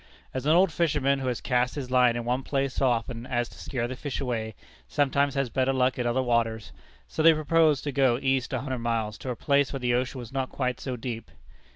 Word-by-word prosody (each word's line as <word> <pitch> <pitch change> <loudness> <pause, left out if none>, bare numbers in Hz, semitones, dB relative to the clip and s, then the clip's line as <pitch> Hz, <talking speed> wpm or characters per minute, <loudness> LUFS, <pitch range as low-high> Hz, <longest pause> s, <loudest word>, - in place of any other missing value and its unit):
As 130 +2 -3
an 155 - +5
old 185 +3 +5
fisherman, 145 -5 +1
who 130 - -3
has 125 -2 -2
cast 125 0 +1
his 130 -4 -5
line 125 -2 +4
in 120 -1 -3
one 125 +2 0
place 135 0 -1
so 135 - +2
often 120 0 -2
as 120 -1 0
to - - -15
scare 120 -4 -3
the 130 - -5
fish 140 +1 -4
away, 110 -5 -3 0.3
sometimes 140 - +1
has 135 -3 -1
better 130 0 +1
luck 130 -1 +1
in 120 - 0
other 130 +2 +1
waters, 115 - 0 0.4
so 65 - -3
they 165 0 +7
proposed 155 -1 +3
to 145 - -2
go 130 -3 +3
east 130 0 0
a 130 -2 -1
hundred 130 -2 -3
miles, 115 -2 -1
to 130 - -6
a 125 - -2
place 140 +3 +2
where 135 - -4
the 125 -1 0
ocean 125 +2 -1
was 125 0 -8
not 135 -1 -1
quite 125 -2 -2
so 130 -2 -4
deep. 115 -2 -6
130 Hz, 240 wpm, -27 LUFS, 120-135 Hz, 0.4 s, they